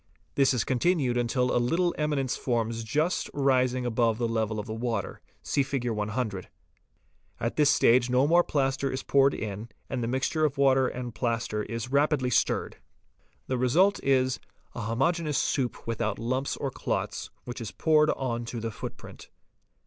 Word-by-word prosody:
This 135 -1 +3
is 115 - +1
continued 130 -1 +1
until 125 +1 +1
a 120 - +3
little 170 +8 +1
eminence 145 -4 -1
forms 115 -2 -1
just 150 +10 0
rising 130 -2 +2
above 115 -2 +1
the 120 -1 0
level 110 -1 -1
of 105 - -4
the 110 - -5
water; 115 -3 -3 0.2
see 140 - +1
Hig. 130 -2 -2
100. 105 -2 -3 0.9
At 115 - -2
this 150 -2 +4
stage 120 -1 +4
no 125 +2 +3
more 170 +3 +5
plaster 135 -2 0
is 130 0 -4
poured 140 0 +3
in, 105 +2 -5 0.2
and 130 -2 -2
the 115 - -1
mixture 130 +5 0
of 145 -3 +1
water 135 -1 +4
and 125 -2 -5
plaster 115 -3 -1
is 115 +3 -5
rapidly 140 -2 +2
stirred. - - +1 0.7
The 130 -1 -2
result 180 +11 +3
is, 130 -2 +2 0.3
a - - -5
homogeneous 150 +7 0
soup 130 -4 -1
without 110 -2 -2
lumps 130 +4 -2
or 135 - -3
clots, - - -3
which 120 0 -7
is 110 - -4
poured 155 +3 +3
on 120 -3 -1
to 115 0 -5
the 115 0 -3
footprint. - - -9
125 Hz, 165 wpm, -27 LUFS, 115-140 Hz, 0.9 s, more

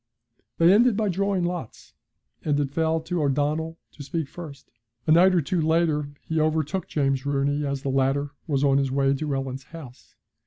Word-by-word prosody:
They 170 +2 +6
ended 230 0 +4
by 215 -2 +1
drawing 195 0 0
lots, 175 -9 -5 0.5
and 145 -1 +1
it 140 -2 -1
fell 160 +1 0
to 170 +1 -2
O'Donnell 150 +3 0
to - - -13
speak 160 +1 -3
first. 150 -5 -10 0.3
A - - +2
night 180 +3 +6
or 175 - +3
two 170 +4 -1
later 160 -2 +1
he 160 0 -1
overtook 155 +3 0
James 135 -3 0
Rooney 145 +1 0
as 140 -1 -3
the 140 - -1
latter 135 +2 +1 0.2
was 140 -3 0
on 140 -1 +4
his 135 -1 0
way 135 +1 +2
to 140 0 -2
Ellen's 135 0 -4
house. 145 -7 -13
150 Hz, 185 wpm, -25 LUFS, 140-165 Hz, 0.5 s, They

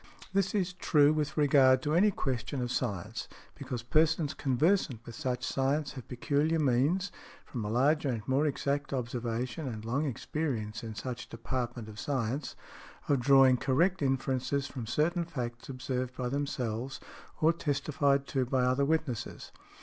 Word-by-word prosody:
This 195 +1 +1
is 185 -3 0
true 150 -4 +4
with 155 0 -2
regard 135 -3 +5
to 150 - 0
any 190 +6 +5
question 135 - -2
of 125 -1 -2
science, 110 -2 -3 0.3
because 130 -4 -5
persons 155 +3 +2
conversant 140 - +1
with 120 - -8
such 125 -1 -3
science 140 +3 0
have 130 -4 -9
peculiar 145 +6 +1
means, 155 +7 +2 0.3
from 120 -5 -5
a 105 - -3
larger 140 +5 +2
and 115 -3 -3
more 135 +3 +2
exact 140 0 -1
observation 120 +2 -3
and 110 -3 -5
long 130 +7 0
experience 120 -5 -3
in 110 -1 -6
such 120 +2 -5
department 120 -1 -4
of 105 -1 -9
science, 135 0 -2 0.5
of 140 -2 +4
drawing 135 0 +6
correct 170 +9 +2
inferences 135 0 0
from 125 -5 -6
certain 170 +8 +1
facts 120 -8 -5
observed 130 -1 -3
by 125 -1 -1
themselves 130 -2 -2 0.4
or 160 +2 +4
testified 140 -2 +1
to 135 -2 0
by 130 0 +1
other 130 +2 +2
witnesses. 150 -6 -2
135 Hz, 150 wpm, -31 LUFS, 125-150 Hz, 0.5 s, drawing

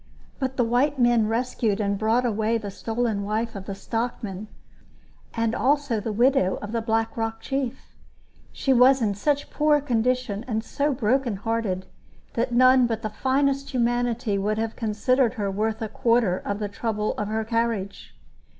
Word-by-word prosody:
But 265 -1 -2
the 245 - +3
white 255 +5 +1
men 240 -3 +3
rescued 225 -2 0
and 200 -1 0
brought 225 +4 +1
away 220 0 +1
the 205 -3 -6
stolen 225 0 -2
wife 220 +3 -2
of 195 -1 -7
the 195 - -4
stockman, 215 -2 -4 0.9
and 230 -1 0
also 275 0 +1
the 220 +2 -3
widow 235 -3 +2
of 210 - -7
the 230 0 -1
Black 225 0 0
Rock 225 0 -2
chief. 270 -1 -4 0.6
She 270 - +1
was 260 +2 +6
in 205 -2 +1
such 285 +8 -1
poor 300 -1 +3
condition 250 -4 0
and 220 -2 -1
so 285 +5 -1
broken 250 -1 +1
hearted 200 -3 -2 0.5
that 240 +2 -1
none 255 +1 +5
but 225 -1 -3
the 215 - -3
finest 275 +4 0
humanity 240 -3 0
would 210 +2 -1
have 225 0 -2
considered 235 +3 +1
her 200 -4 -2
worth 220 +3 -1
a - - -2
quarter 230 -3 +2
of 200 - -3
the 210 0 -3
trouble 210 +1 -2
of 210 - -2
her 220 +1 -1
carriage. 225 -4 -2
230 Hz, 170 wpm, -25 LUFS, 215-250 Hz, 0.9 s, was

